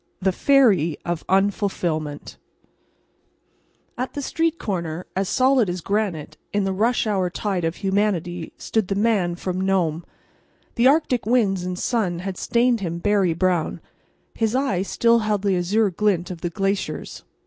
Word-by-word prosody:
THE 190 0 +1
FERRY 200 - +3
OF 170 -2 -2
UNFULFILMENT 185 -6 -1 1.6
At 255 - -3
the 290 - -3
street 330 +3 0
corner, 175 - -4
as 190 0 -1
solid 255 -5 +3
as 175 0 -3
granite 200 -5 -2
in 205 -1 0
the 195 0 -1
"rush 230 +6 +1
hour" 195 -4 0
tide 190 -1 -2
of 165 +1 -1
humanity, 190 -4 -1
stood 220 -4 -1
the 195 - -1
Man 200 -5 +1
from 185 +1 -3
Nome. 175 -4 0 0.7
The 235 +2 +3
Arctic 265 -6 +2
winds 205 -6 +2
and 180 0 -4
sun 195 -6 0
had 185 +2 -5
stained 240 0 +2
him 170 -4 -3
berry 195 -2 +1
brown. 180 -2 0 0.5
His 225 +1 0
eye 260 -9 +1
still 230 +4 +2
held 210 -2 -1
the 200 -2 +2
azure 200 +4 +1
glint 185 -1 0
of 175 -2 -8
the 175 - -2
glaciers. 195 - -3
195 Hz, 150 wpm, -23 LUFS, 175-220 Hz, 1.6 s, FERRY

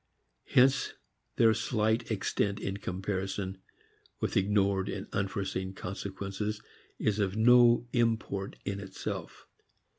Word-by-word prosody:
Hence 130 +2 +4 0.4
their 115 -1 +5
slight 110 0 0
extent 100 -1 0
in 100 -1 -3
comparison 95 0 -3 0.6
with - - -2
ignored 100 -1 +2
and - - -4
unforeseen 95 -1 -2
consequences 100 +2 -4 0.4
is 105 -1 0
of 100 0 0
no 120 +1 +6
import 115 -5 0
in 100 0 -2
itself. 95 -1 -6
100 Hz, 100 wpm, -30 LUFS, 95-110 Hz, 0.6 s, no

